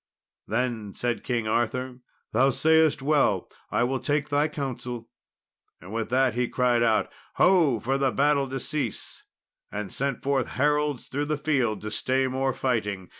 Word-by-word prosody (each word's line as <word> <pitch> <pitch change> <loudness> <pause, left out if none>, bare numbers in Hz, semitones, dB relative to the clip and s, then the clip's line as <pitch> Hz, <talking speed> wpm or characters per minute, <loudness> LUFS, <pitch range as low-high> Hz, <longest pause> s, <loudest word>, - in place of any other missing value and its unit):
Then 110 -3 -2
said 120 -1 -2
King 115 -3 -1
Arthur, 125 +3 -1 0.3
"Thou 130 +5 +4
sayest 160 +1 +3
well, 150 0 +2 0.2
and - - 0
I - - +4
will 130 +2 0
take 145 +1 -1
thy 145 +1 +2
counsel." 125 -5 -5 0.7
With 110 +4 -4
that 130 -1 +2
he 125 +1 0
cried 125 -1 +2
out, 115 -2 +2 0.2
"Ho!" 165 - +4
for 135 +4 -1
the 135 -1 +3
battle 140 0 +2
to 135 0 -3
cease, 140 -6 -4 0.5
and 105 -3 -5
sent 135 -2 -2
forth 135 -2 +1
heralds 150 -1 +1
through 145 +2 -2
the 150 0 -1
field 130 -8 0
to 110 - -5
stay 130 +5 0
more 130 +1 0
fighting. 105 -8 -2
130 Hz, 160 wpm, -26 LUFS, 120-145 Hz, 0.7 s, Thou